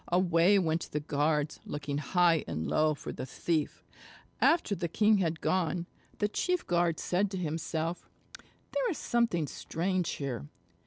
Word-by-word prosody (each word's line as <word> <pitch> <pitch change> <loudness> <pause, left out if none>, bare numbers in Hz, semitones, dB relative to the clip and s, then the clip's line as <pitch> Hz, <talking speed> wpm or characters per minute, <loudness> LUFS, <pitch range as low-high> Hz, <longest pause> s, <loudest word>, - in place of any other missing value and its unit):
Away 175 +2 +4
went 165 -3 0
the 150 - -1
guards 150 0 0
looking 145 0 -4
high 170 0 +3
and 80 +1 -3
low 155 0 +2
for - - -7
the - - -6
thief. 155 +3 -2 0.6
After 325 -10 +3
the 175 -3 -2
king 210 +4 +3
had 165 -3 -1
gone, 180 -1 0 0.3
the 210 - +1
chief 360 - -1
guard 170 -2 +1
said 190 +3 +1
to 190 - -4
himself: 165 0 -3 0.6
"There - - +1
is 345 - -2
something 230 -9 +1
strange 175 +5 -2
here. 130 - -4
170 Hz, 150 wpm, -30 LUFS, 155-190 Hz, 0.6 s, Away